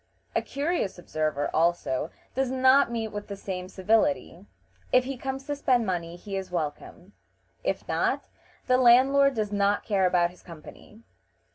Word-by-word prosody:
A - - +2
curious 280 - -2
observer, 155 -4 -2
also, 165 -4 +1 0.2
does 265 0 0
not 260 0 +4
meet 225 -2 -2
with 205 -1 -7
the 200 - -6
same 185 -2 -6
civility: 225 +10 0 0.4
if 255 - +5
he 270 +1 -4
comes 265 +1 -5
to 290 - -2
spend 255 -4 +2
money 175 -3 -3
he 195 +3 -7
is 190 -1 -4
welcome; 175 +3 -5 0.5
if - - -2
not, - - 0 0.4
the 255 -1 +3
landlord 265 +3 +5
does 215 -2 -2
not 205 0 +1
care 195 -4 +2
about 175 -1 +2
his 180 - -19
company. 175 +6 -13
205 Hz, 155 wpm, -27 LUFS, 180-260 Hz, 0.5 s, if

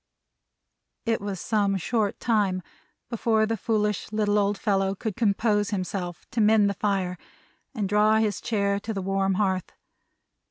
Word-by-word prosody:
It 225 -2 0
was 200 -2 -4
some 200 -2 +1
short 210 +2 -1
time 200 -6 +1 0.5
before 220 -1 +2
the 225 +1 -1
foolish 210 -2 -1
little 210 -1 +2
old 200 0 +1
fellow 195 -2 0
could 210 0 -4
compose 210 -2 +1
himself 185 -3 -4
to 230 - 0
mend 210 -1 +5
the - - -3
fire, 190 -3 -1 0.6
and 210 -4 -1
draw 210 +2 +4
his 215 -3 0
chair 200 -3 0
to 220 +1 -5
the 195 - -2
warm 195 0 +1
hearth. 190 -2 -1
205 Hz, 150 wpm, -26 LUFS, 195-215 Hz, 0.6 s, mend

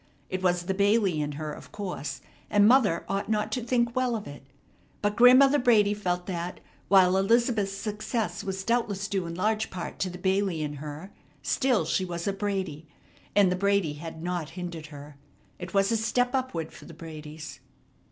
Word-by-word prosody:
It 185 0 -2
was 180 -1 +1
the 190 +2 -1
Bailey 200 -4 +2
in 145 0 -3
her, 150 +1 -5
of - - -12
course, 180 -8 -5 0.3
and 205 -1 +5
mother 225 -9 +4
ought 195 +2 -2
not 215 0 0
to 245 +2 -2
think 235 0 +1
well 255 -2 +1
of 215 - -5
it. 145 0 -9 0.6
But 205 0 +1
Grandmother 265 +4 +7
Brady 215 -4 +4
felt 180 -3 -2
that, 175 -1 -4 0.3
while 190 -2 +5
Elizabeth's 215 0 +2
success 215 +2 -3
was 190 0 -4
doubtless 205 -4 0
due 190 -4 -2
in 170 - -5
large 215 +4 0
part 180 -2 -6
to 185 - 0
the 180 - -8
Bailey 190 -3 0
in 145 -1 -4
her, 150 +6 -8 0.3
still, 255 -5 +2
she 190 - 0
was 170 -2 -4
a 200 - 0
Brady, 190 -6 -3 0.5
and 200 -3 +5
the - - +1
Brady 200 -4 +1
had 160 +2 -8
not 175 -3 -2
hindered 170 -3 -6
her. 145 -1 -11 0.4
It 180 +2 -7
was 195 +2 +3
a 230 - +2
step 245 +3 +1
upward 255 -12 -2
for - - -13
the 165 - -12
Bradys. 155 -1 -9
195 Hz, 185 wpm, -27 LUFS, 170-215 Hz, 0.6 s, Grandmother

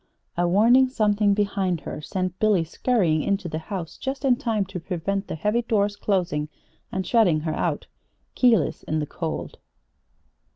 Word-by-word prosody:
A 175 0 +1
warning 235 +8 +5
something 210 -4 +2
behind 195 -5 0
her - - -6
sent 185 +2 -3
Billy 210 -5 +3
scurrying 170 -3 +1
into 195 +2 -1
the 155 -1 -3
house 170 0 -6
just 270 +1 -4
in 255 -2 +5
time 220 -4 -1
to 190 -1 -6
prevent 195 +3 -3
the - - -4
heavy 210 +9 0
door's 205 -3 0
closing 175 -8 -1 0.4
and 190 0 -2
shutting 180 -10 +3
her 155 0 -2
out, - - -2 0.5
keyless, 230 - +3
in 155 - -2
the 150 - -1
cold. 160 +2 -5
195 Hz, 160 wpm, -24 LUFS, 170-215 Hz, 0.5 s, warning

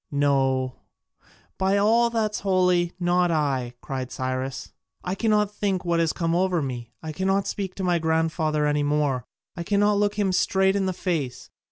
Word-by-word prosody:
"No, 135 -3 +1 0.8
by 190 +1 +2
all 230 +4 +4
that's 220 -2 -1
holy, 180 -3 +2
not 175 0 +2
I!" 135 -6 -1
cried 130 -2 -5
Cyrus. 130 0 -4 0.3
"I 180 - -2
cannot 210 -1 +1
think 195 -3 -1
what 170 -1 +1
has 165 -1 +2
come 165 -2 -1
over 180 0 +2
me: 125 -5 -5
I 160 - -4
cannot 190 +4 0
speak 195 -2 -4
to 195 - -4
my 175 -2 +2
grandfather 160 -1 0
any 150 0 +1
more; 145 -4 0 0.3
I 170 - -5
cannot 205 +3 +2
look 205 0 +1
him 200 -3 +1
straight 190 +1 +2
in 195 -1 0
the - - +1
face. 160 -9 -3
175 Hz, 170 wpm, -25 LUFS, 145-195 Hz, 0.8 s, all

